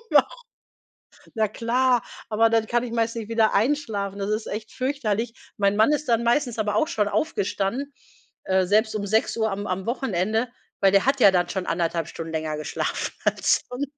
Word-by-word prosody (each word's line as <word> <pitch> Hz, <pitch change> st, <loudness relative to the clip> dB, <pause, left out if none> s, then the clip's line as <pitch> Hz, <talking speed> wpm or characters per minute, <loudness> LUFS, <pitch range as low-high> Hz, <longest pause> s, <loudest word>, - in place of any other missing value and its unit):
Waru“ -, -, +6 dB, 1.1 s
Na 220 Hz, -1 st, +2 dB
klar, 245 Hz, +3 st, +1 dB, 0.3 s
aber 225 Hz, +1 st, +3 dB
dann 225 Hz, -1 st, +2 dB
kann 240 Hz, +2 st, +1 dB
ich 245 Hz, -, -5 dB
meistens 230 Hz, 0 st, 0 dB
nicht 215 Hz, -, -10 dB
wieder 225 Hz, -1 st, +2 dB
einschlafen. 205 Hz, -5 st, 0 dB
Das 200 Hz, +1 st, -2 dB
ist 215 Hz, +1 st, -2 dB
echt 215 Hz, +1 st, -5 dB
fürchterlich. 240 Hz, -4 st, -2 dB, 0.2 s
Mein 200 Hz, -1 st, +2 dB
Mann 220 Hz, +6 st, +4 dB
ist 300 Hz, 0 st, -1 dB
dann 235 Hz, -1 st, +2 dB
meistens 240 Hz, 0 st, +1 dB
aber 210 Hz, -1 st, 0 dB
auch 315 Hz, -, +2 dB
schon 215 Hz, -11 st, 0 dB
aufgestanden, 260 Hz, -2 st, -1 dB, 0.5 s
äh, 190 Hz, 0 st, +2 dB
selbst 215 Hz, +3 st, +2 dB
um 205 Hz, -, -2 dB
6:00 220 Hz, +1 st, +1 dB
am 205 Hz, +1 st, -4 dB
am 185 Hz, +1 st, -3 dB
Wochenende, 220 Hz, -2 st, 0 dB, 0.3 s
weil 195 Hz, -, +4 dB
der 195 Hz, +1 st, +4 dB
hat 270 Hz, +1 st, +2 dB
ja 205 Hz, -, +8 dB
dann 175 Hz, -1 st, +1 dB
schon 190 Hz, -2 st, -3 dB
1,5 170 Hz, -2 st, -1 dB
Stunden 165 Hz, -1 st, -7 dB
länger 155 Hz, -1 st, -2 dB
geschlafen 150 Hz, -, -3 dB
als -, -, +2 dB
son 250 Hz, +3 st, -4 dB
220 Hz, 185 wpm, -24 LUFS, 200-240 Hz, 1.1 s, ja